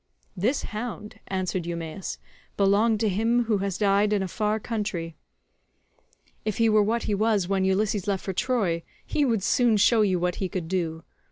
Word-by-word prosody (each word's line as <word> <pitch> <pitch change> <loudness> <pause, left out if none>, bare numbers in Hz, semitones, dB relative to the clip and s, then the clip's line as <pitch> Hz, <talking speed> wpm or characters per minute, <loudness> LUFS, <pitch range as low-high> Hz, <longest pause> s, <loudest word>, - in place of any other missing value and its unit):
"This 235 +10 0
hound," 215 -1 -6
answered 185 -2 -2
Eumaeus, 170 +2 -5 0.4
"belonged 205 +3 +3
to 220 - +2
him 225 +5 +2
who 220 -3 0
has 195 -2 -2
died 205 0 +3
in 200 -2 +1
a - - -2
far 215 +3 -1
country. 205 -8 -3 1.3
If 215 -2 -2
he 230 -1 +4
were 215 0 +5
what 225 +3 0
he 210 - -1
was 210 -2 +1
when 190 0 +1
Ulysses 195 +1 0
left 195 -2 -1
for 190 - -2
Troy, 190 -6 0 0.2
he 295 - 0
would 230 -7 +1
soon 235 -1 +3
show 220 +3 +4
you 190 -3 +2
what 180 0 -1
he 190 - -2
could 175 -3 -4
do. 165 -3 -2
205 Hz, 180 wpm, -26 LUFS, 185-220 Hz, 1.3 s, were